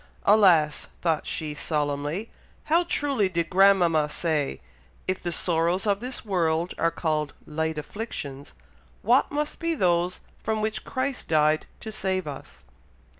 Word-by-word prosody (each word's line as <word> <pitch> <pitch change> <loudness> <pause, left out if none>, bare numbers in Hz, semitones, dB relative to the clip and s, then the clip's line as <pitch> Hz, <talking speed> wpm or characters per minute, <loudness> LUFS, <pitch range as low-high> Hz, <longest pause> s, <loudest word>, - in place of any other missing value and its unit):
"Alas!" 180 -8 +4 0.2
thought 165 -3 0
she 155 -2 -3
solemnly, 150 +6 -2 0.3
"how 335 +3 +3
truly 275 - +1
did 170 -2 -2
grandmama 180 -5 +4
say, 150 -3 -1 0.5
'If 185 0 -1
the 175 - -2
sorrows 170 +3 +1
of 200 -1 +2
this 250 +1 -5
world 170 -3 0
are 165 - +3
called 155 -3 -2
'light 160 +1 -2
afflictions,' 150 - -6 0.5
what 245 +6 +4
must 295 +1 -2
be 335 0 0
those 175 - +1 0.2
from 220 0 -1
which 215 0 -2
Christ 260 0 -3
died 155 0 +2
to 220 - -6
save 190 -3 -1
us!' 145 -3 -9
175 Hz, 135 wpm, -26 LUFS, 155-215 Hz, 0.5 s, Alas